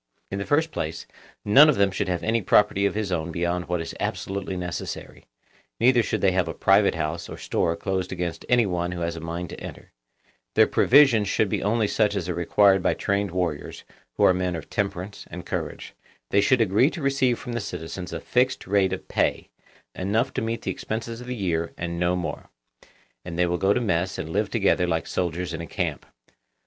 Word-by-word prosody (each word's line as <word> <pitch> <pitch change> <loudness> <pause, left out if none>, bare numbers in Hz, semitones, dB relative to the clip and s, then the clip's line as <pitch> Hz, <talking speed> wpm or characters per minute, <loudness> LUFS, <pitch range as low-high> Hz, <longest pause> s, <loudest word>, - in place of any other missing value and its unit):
In 100 - -3
the 100 - -4
first 160 +2 +2
place, 80 - -4 0.4
none 140 +9 +8
of 150 - +3
them 100 -3 +3
should 95 - -2
have 90 -2 -2
any 115 +1 +1
property 100 +1 +3
of - - -4
his 105 -3 -2
own 85 -1 -2
beyond 85 +1 -2
what 90 -1 0
is 80 - -6
absolutely 95 -1 -3
necessary; 90 -1 -6 0.5
neither 120 +1 +5
should - - -2
they 95 - +4
have 90 -2 +1
a 80 - -4
private - - +4
house 75 +2 -3
or - - -7
store 85 - 0
closed 95 0 -2
against 90 -2 -4
any 120 -2 +4
one 90 -2 -2
who 85 - -5
has 85 0 -2
a - - -6
mind 85 +1 -5
to - - -8
enter; - - -10 0.6
their - - +7
provisions 125 -6 +5
should 105 +1 +1
be - - -1
only 110 +1 +1
such 105 -1 +1
as 90 -4 -2
are 90 - -1
required 95 +3 +4
by - - +1
trained 100 0 0
warriors, 85 -4 -3 0.3
who - - +2
are - - +6
men 90 -1 -1
of 80 - -8
temperance 100 0 -3
and - - -8
courage; - - -5 0.4
they 100 - +4
should 120 +4 +3
agree 110 +6 +4
to 170 - -7
receive 135 -3 +2
from 125 - -7
the 120 - -1
citizens 90 0 -6
a 85 - -4
fixed 125 +7 0
rate 95 -1 +2
of 95 - -6
pay, - - 0 0.4
enough 110 +8 0
to - - -2
meet 115 +1 -3
the - - -1
expenses 115 +1 -5
of 125 - -10
the 125 - -3
year 85 -6 -2
and 85 0 -4
no 90 +1 +2
more; 90 -2 -5 0.7
and 85 -1 -7
they 90 - +3
will 90 0 -1
go 95 - +3
to 115 - +2
mess 90 -5 -1
and 90 -4 -5
live 100 +4 0
together 100 -5 +2
like 80 -1 -1
soldiers 90 0 -2
in - - -4
a 85 - -7
camp. 85 -9 -3
95 Hz, 215 wpm, -25 LUFS, 85-110 Hz, 0.7 s, none